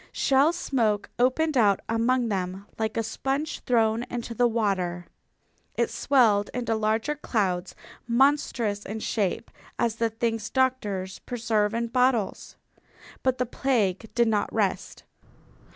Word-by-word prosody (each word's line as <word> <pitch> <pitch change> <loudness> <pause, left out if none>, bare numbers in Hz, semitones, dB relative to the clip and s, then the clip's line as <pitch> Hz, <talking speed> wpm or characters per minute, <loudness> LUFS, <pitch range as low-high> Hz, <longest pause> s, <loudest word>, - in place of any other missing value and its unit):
Shell 275 +4 +3
smoke 225 - 0
opened 285 +5 +2
out 205 -5 +4
among 235 +2 +1
them 190 0 -3
like 220 0 -1
a 225 - +1
sponge 270 +7 -2
thrown 225 -2 +2
into 235 -1 -4
the 245 +2 +3
water. 190 -6 -1 0.7
It - - 0
swelled 220 -7 +3
into 235 -2 -1
larger 220 +5 0
clouds 195 -10 -2 0.3
monstrous 235 -5 +2
in 220 +2 -6
shape 210 +1 -2 0.3
as 230 -1 0
the 230 -1 +1
things 225 -1 -2
doctors 210 -8 -1
preserve 225 -3 -1
in 235 0 0
bottles. 245 -3 0 0.7
But 260 -1 +1
the 250 - 0
plague 225 -5 0
did 235 -1 +3
not 210 -2 0
rest. - - -2
230 Hz, 130 wpm, -26 LUFS, 210-250 Hz, 0.7 s, out